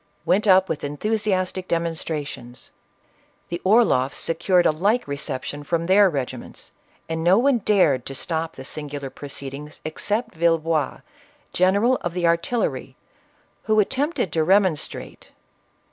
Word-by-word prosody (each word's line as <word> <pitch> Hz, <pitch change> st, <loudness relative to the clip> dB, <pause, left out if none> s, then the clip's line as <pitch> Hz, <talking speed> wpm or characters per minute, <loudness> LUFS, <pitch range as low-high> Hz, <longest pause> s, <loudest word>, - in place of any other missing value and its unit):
went 205 Hz, +4 st, +2 dB
up 190 Hz, 0 st, +6 dB
with 160 Hz, -, -4 dB
enthusiastic 185 Hz, +3 st, -1 dB
demonstrations; 155 Hz, -7 st, -4 dB, 0.8 s
the 170 Hz, 0 st, -4 dB
Orloffs 185 Hz, -, +3 dB
se -, -, -1 dB
cured 175 Hz, +2 st, +2 dB
a -, -, +5 dB
like 205 Hz, +10 st, 0 dB
reception 140 Hz, 0 st, -4 dB
from 165 Hz, +3 st, -1 dB
their 195 Hz, +2 st, +5 dB
regiments, 130 Hz, -5 st, -6 dB, 0.4 s
and 160 Hz, 0 st, -3 dB
no 180 Hz, +3 st, +5 dB
one 255 Hz, +1 st, +3 dB
dared 180 Hz, -, +3 dB
to 135 Hz, -, -6 dB
stop 160 Hz, +3 st, -3 dB
the 130 Hz, -, -9 dB
singular 145 Hz, -2 st, -5 dB
proceedings, 140 Hz, +1 st, -7 dB
except 205 Hz, +9 st, -2 dB
Villebois, 165 Hz, -2 st, 0 dB, 0.5 s
General 200 Hz, +8 st, +3 dB
of 175 Hz, 0 st, -5 dB
the 180 Hz, -1 st, 0 dB
Artillery, 170 Hz, +8 st, 0 dB, 0.7 s
who 215 Hz, -1 st, +3 dB
attempted 265 Hz, -, 0 dB
to 160 Hz, -, +2 dB
remonstrate. 185 Hz, -2 st, 0 dB
170 Hz, 130 wpm, -23 LUFS, 150-200 Hz, 0.8 s, up